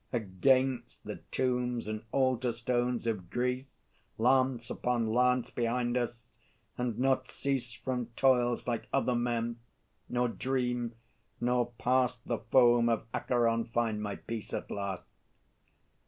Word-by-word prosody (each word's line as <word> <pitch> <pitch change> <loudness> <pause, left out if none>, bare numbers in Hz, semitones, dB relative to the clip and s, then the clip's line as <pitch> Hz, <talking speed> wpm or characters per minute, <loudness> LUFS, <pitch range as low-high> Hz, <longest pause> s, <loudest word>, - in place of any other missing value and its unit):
Against 120 +3 +1
the - - -5
tombs 125 -2 0
and 110 0 -3
altar 130 -2 +2
stones 120 0 0
of 100 -7 -2
Greece, 125 +2 -2 0.4
Lance 130 0 +2
upon 120 -2 0
lance 125 0 +3
behind 120 +1 0
us; 120 -1 -2 0.5
and 125 -3 -2
not 130 0 +2
cease 130 -4 -2
From 125 +2 -3
toils, 125 -2 +3
like 120 -2 -2
other 135 -2 +2
men, 120 -1 -1 0.5
nor 125 0 +1
dream, 125 -1 -1 0.4
nor 120 0 +1
past 125 -1 +1
The 120 - -1
foam 120 0 +5
of 115 -1 0
Acheron 115 -2 +1
find 115 -2 -1
my 105 -1 -3
peace 115 -2 -5
at - - -5
last. 100 -2 -3
120 Hz, 125 wpm, -31 LUFS, 115-125 Hz, 0.5 s, foam